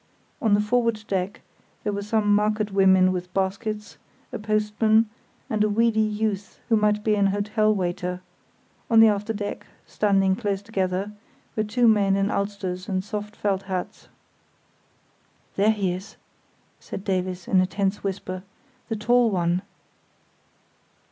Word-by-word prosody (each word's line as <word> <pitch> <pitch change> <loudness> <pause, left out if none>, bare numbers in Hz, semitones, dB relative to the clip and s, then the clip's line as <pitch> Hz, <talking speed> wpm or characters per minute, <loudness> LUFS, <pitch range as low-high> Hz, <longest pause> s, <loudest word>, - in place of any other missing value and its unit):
On 215 -3 +4
the 205 - +2
forward 230 0 +1
deck 190 0 -2 0.4
there 210 - -1
were 200 - -2
some 210 0 +1
market 210 0 +1
women 190 -1 +5
with 180 -1 -4
baskets, 205 +2 -2 0.3
a - - -3
postman, 215 +1 +2 0.4
and 215 -1 +1
a 215 - +2
weedy 225 +1 +2
youth 215 -2 -1
who 225 - +5
might 210 -1 +2
be 215 - +2
an 200 -1 +3
hotel 215 +2 +1
waiter; 180 -1 -2 0.7
on 225 -1 +6
the 225 - +9
after 210 +1 -1
deck, 205 -1 -5 0.2
standing 195 -2 +2
close 200 -3 -2
together, 195 -1 -2 0.4
were 215 - +1
two 235 +3 +2
men 200 -3 +4
in 195 +1 +1
ulsters 200 -2 -3
and 185 -1 -1
soft 210 0 -5
felt 195 -2 0
hats. 190 -2 -5 1.5
"There 205 +2 +3
he 200 -5 +1
is!" 185 +3 -8 0.6
said 195 - -7
Davies, 185 -2 -2
in 185 - +4
a 185 - +1
tense 195 +2 -1
whisper; 185 -1 -4 0.5
"the 225 - -1
tall 240 +2 +3
one." 175 -2 0
205 Hz, 145 wpm, -24 LUFS, 190-215 Hz, 1.5 s, the